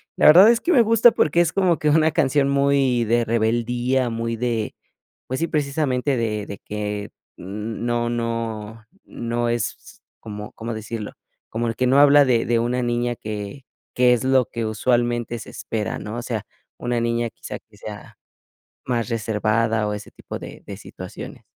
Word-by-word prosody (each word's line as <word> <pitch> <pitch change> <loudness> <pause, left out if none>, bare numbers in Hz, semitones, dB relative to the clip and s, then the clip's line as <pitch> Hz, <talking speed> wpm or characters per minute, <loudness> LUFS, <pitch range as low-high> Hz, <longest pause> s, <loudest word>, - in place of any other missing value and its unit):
La - - +5
verdad 180 +8 +9
es 235 - +1
que 350 - 0
me 260 - +6
gusta 230 +1 +6
porque 170 -2 +2
es 170 -2 +1
como 185 -4 +2
que 150 - +1
una 160 +1 +4
canción 145 -3 +2
muy 140 -3 +2
de 120 +1 +2
rebeldía, 120 +3 +1
muy 115 0 -2
de, 115 -2 -2 0.5
pues 130 - -3
sí, 165 - 0
precisamente 140 -3 0
de 105 -3 -1
de 100 - -7
que 105 -1 -4 0.3
n 105 +5 -5
no 120 0 0
no 115 -2 -4 0.2
no 120 0 -2
es, 115 -1 -4 0.2
¿cómo 105 -1 -8
cómo 115 +1 -5
decirlo? 110 -1 -6 0.4
Como 115 +1 -2
el 115 - -2
que 130 - 0
no 135 +3 +5
habla 145 0 +7
de 120 -3 +2
de 115 -1 +2
una 120 +2 0
niña 120 0 0
que 105 +5 -6 0.3
que 125 0 +4
es 120 - 0
lo 130 -1 +4
que 115 +1 -4
usualmente 120 +1 0
se - - -10
espera, 110 -2 -4
¿no? 105 +3 -6
O - - -3
sea, 110 -4 -3 0.3
una 120 -1 -1
niña, 115 0 0
quizá, - - -8
que - - -23
sea - - -10 0.7
más 120 -2 -1
reservada, 110 0 0
o, 105 - -2
ese 105 0 -8
tipo - - -8
de - - -10
de - - -7
situaciones. - - -9
120 Hz, 180 wpm, -22 LUFS, 110-130 Hz, 0.7 s, verdad